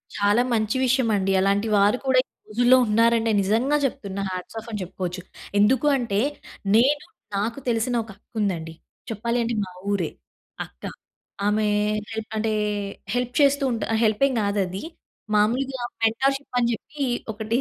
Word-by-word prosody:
చాలా 205 +3 +3
మంచి 215 +1 +1
విషయమండి. 225 -7 +2
అలాంటి 200 +3 +2
వారు 205 +4 +4
కూడా 260 -1 +4
ఈ - - -69 0.2
రోజుల్లో 245 +4 +5
ఉన్నారంటే 230 +1 +3
నిజంగా 230 +9 +2
చెప్తున్నా 200 -7 -3
హాట్స్ 185 +4 -6
ఆఫ్ 220 - -12
అని 210 -3 -3
చెప్పుకోచ్చు. 180 0 -5 0.4
ఎందుకూ 260 +8 +4
అంటే 215 -5 -1 0.6
నేను 280 +6 +4 0.3
నాకు 225 +6 -1
తెలిసిన 235 +2 0
ఒక 220 - -16
అక్క 205 - -36
ఉందండి. 165 -5 -2 0.4
చెప్పాలి 235 +2 -1
అంటే 235 0 -1
మా 185 - -11 0.2
ఊరే, 185 -6 0 0.6
అక్క. 60 - -23 0.6
ఆమే 210 +1 +2 0.4
హెల్పంటే, 220 0 -2 0.6
హెల్ప్ 245 0 -1
చేస్తూ 280 0 +4
ఉంటా 225 -2 -2 0.2
హెల్పేమి 230 +4 +2
గాదది. 200 -2 -1 0.5
మామూలుగా 250 +5 +1 0.2
మెంటర్‌షిప్ 270 +4 +1
అని 235 0 +2
జెప్పి 280 +5 -4 0.3
ఒకటీ 220 +2 -1
225 Hz, 135 wpm, -24 LUFS, 205-245 Hz, 0.6 s, రోజుల్లో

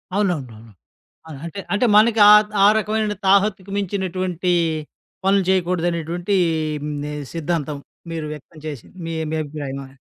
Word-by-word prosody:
అవునవునవును. 130 - -2 0.6
అవును 150 -4 -9
అంటే 170 +4 -6
అంటే 210 +5 +2
మనకి 225 +1 +5
ఆహ్, 210 0 +8 0.2
ఆ - - +8
రకమైన 215 0 -1
తాహత్తుకు 195 0 +2
మించినటువంటి 185 -2 -2 0.7
పనులు 195 0 +4
చేయకూడదనేటువంటి 175 0 0 0.5
హ్మ్, 150 -1 -4 0.3
సిద్ధాంతం 155 -3 -2 0.3
మీరు 160 -2 -4
వ్యక్తం 155 +2 -13
చేసింది. 145 - -8
మీ 165 - -4 0.2
మీ 160 - -1
అభిప్రాయమా? 140 -2 -6
175 Hz, 120 wpm, -21 LUFS, 150-200 Hz, 0.7 s, ఆహ్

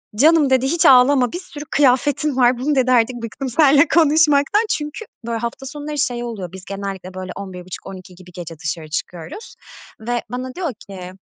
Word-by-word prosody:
"Canım." 300 +4 +4
dedi. 260 0 +3
"Hiç 335 +3 +1
ağlama, 255 -1 +6
bir 350 - -4
sürü 295 -5 -10
kıyafetin 285 +1 +2
var." 245 -1 +4
"Bunu" 285 +4 0
dedi, 255 -1 +2
"Artık 245 0 +3
bıktım 260 +4 -5
seninle 290 +3 +5
konuşmaktan." 310 +4 +3
Çünkü, 300 +8 -3 0.2
böyle, 230 -1 -1
hafta 235 +3 -5
sonları 295 +2 -6
şey 245 -4 -1
oluyor, 205 -7 -6
biz 190 0 -11
genellikle, 195 -2 -6
böyle, 185 0 -6
23.30-00.00 185 -1 -9
gibi 180 0 -15
gece 170 -2 -8
dışarı 155 +1 -5
çıkıyoruz 170 - -6 0.5
ve 240 +2 -2
bana 255 +1 -5
diyor 345 -7 -3 0.2
ki 185 -2 -8
250 Hz, 170 wpm, -20 LUFS, 195-290 Hz, 0.5 s, ağlama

